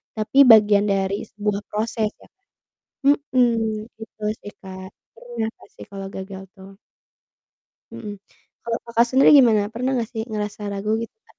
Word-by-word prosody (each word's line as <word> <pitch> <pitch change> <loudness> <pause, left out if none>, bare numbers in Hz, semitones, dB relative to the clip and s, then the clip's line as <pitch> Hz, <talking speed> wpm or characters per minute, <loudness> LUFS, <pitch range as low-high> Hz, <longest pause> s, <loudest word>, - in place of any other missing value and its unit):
tapi 215 +5 -3
bagian 210 -3 +6
dari 195 0 -1
sebuah 210 -1 -2
proses 220 0 -1
ya - - -20
kan? - - -55 0.8
Mhm, 265 -4 +1 0.5
gitu, - - -30
betul 215 -1 -6
sih 205 - -9
Kak, 190 0 -9 0.3
pernah 230 -1 -5
nggak - - -20
sih - - -10
kalau 195 -1 -7
gagal 190 0 -8
tuh 195 +1 -13 1.2
Mhm, 210 -2 -7 0.5
kalau 230 0 -2
Kakak 235 0 +2
sendiri 265 +1 +5
gimana, 225 -5 +5
pernah 250 +3 -2
nggak 225 - -2
sih 220 - -3
ngerasa 210 0 -4
ragu 200 +2 -2
gitu 230 - -8
Kak? - - -25
215 Hz, 160 wpm, -22 LUFS, 200-230 Hz, 1.2 s, bagian